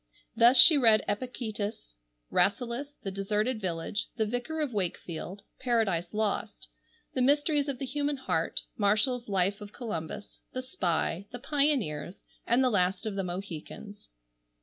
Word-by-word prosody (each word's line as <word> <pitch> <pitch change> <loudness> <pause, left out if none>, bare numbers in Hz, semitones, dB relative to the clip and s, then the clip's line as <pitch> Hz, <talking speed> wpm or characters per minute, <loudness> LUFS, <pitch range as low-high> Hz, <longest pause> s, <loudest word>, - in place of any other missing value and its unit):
Thus 240 +3 +6
she 310 +2 +10
read 225 -4 +5
Epictetus, 215 - -4 0.4
Rasselas, 245 +7 0
The 195 - -3
Deserted 210 +4 -1
Village, 180 +2 -3
The 220 -2 0
Vicar 245 +8 -3
of 295 -5 -2
Wakefield, 185 0 -4 0.2
Paradise 220 -9 0
Lost, 215 0 -2 0.4
the 260 - 0
Mysteries 290 +2 +2
of 275 -2 -3
the 270 - -4
Human 290 +2 -2
Heart, 180 -10 -1
Marshall's 220 +4 +1
Life 195 +1 0
of 205 0 -10
Columbus, 205 -4 -6
The 255 - -4
Spy, 180 -5 -1
The 245 - -5
Pioneers, 245 - -1 0.2
and 240 +3 +3
The 255 - +3
Last 185 0 +1
of 215 - -2
the 195 - -1
Mohicans. 185 +3 -8
215 Hz, 140 wpm, -29 LUFS, 195-255 Hz, 0.4 s, she